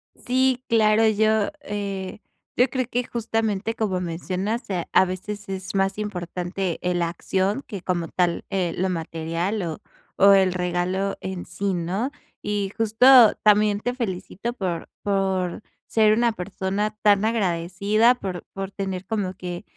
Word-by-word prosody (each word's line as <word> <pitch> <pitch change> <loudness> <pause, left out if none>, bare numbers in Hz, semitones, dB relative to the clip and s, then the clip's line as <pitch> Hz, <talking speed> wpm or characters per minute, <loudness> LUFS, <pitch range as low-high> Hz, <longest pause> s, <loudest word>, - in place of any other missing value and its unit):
Sí, 255 0 +1
claro. 220 -1 +4
Yo, 215 0 +2
eh, 200 -4 -4 0.4
yo 250 +1 +4
creo 255 0 -1
que 245 +1 0
justamente 225 -2 -1
como 195 -6 -1
mencionas, 185 +7 -3
a 180 -3 -2
a - - +5
veces 205 +3 -6
es 190 0 -5
más 195 0 +1
importante, 180 -2 -3
eh, 180 0 0
la 170 -1 +1
acción 190 +7 -1
que 200 -5 -6
como 175 -2 -1
tal, 175 -1 0
eh, 185 -4 -1
lo 190 +1 0
material 165 +4 -2
o 160 -3 -5 0.4
o 200 +1 +8
el 190 -1 +4
regalo 180 +2 -1
en 190 -2 -5
sí, 200 -1 -2
¿no? 185 +9 -1 0.3
Y 205 -2 -2
justo 225 +1 +6
también 210 -1 +4
te 245 - -1
felicito 230 0 -4
por 185 -7 -3
por 190 -2 0 0.2
ser 215 -1 +4
una 235 +1 +3
persona 200 +2 -3
tan 205 -1 +5
agradecida, 205 +2 +2
por 185 -7 -5
por 195 0 -5
tener 190 -2 -4
como 195 -3 -2
que 180 0 -6
195 Hz, 150 wpm, -24 LUFS, 180-215 Hz, 0.4 s, o